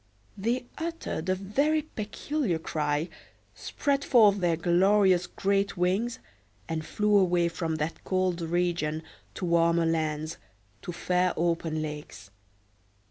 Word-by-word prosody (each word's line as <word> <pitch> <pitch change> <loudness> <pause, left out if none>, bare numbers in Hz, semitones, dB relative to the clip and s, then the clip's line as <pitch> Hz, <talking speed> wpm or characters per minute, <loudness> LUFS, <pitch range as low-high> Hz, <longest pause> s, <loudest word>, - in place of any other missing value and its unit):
They 235 +5 -1
uttered 325 - -4
a 185 - +3
very 280 +11 +1
peculiar 225 - -2
cry, 150 0 -1 0.5
spread 280 -1 -1
forth 210 -7 +5
their 175 -2 +2
glorious 185 +1 +3
great 200 0 0
wings, 200 +8 0 0.5
and 160 -1 -3
flew 210 +5 +1
away 175 -2 +2
from 165 -1 -3
that 155 +1 -4
cold 185 -2 0
region 165 -2 -1 0.3
to - - -3
warmer 170 0 +3
lands, 155 -1 -1 0.4
to - - -5
fair 180 +1 +1
open 165 -2 0
lakes. 150 -10 -8
180 Hz, 120 wpm, -28 LUFS, 165-205 Hz, 0.5 s, forth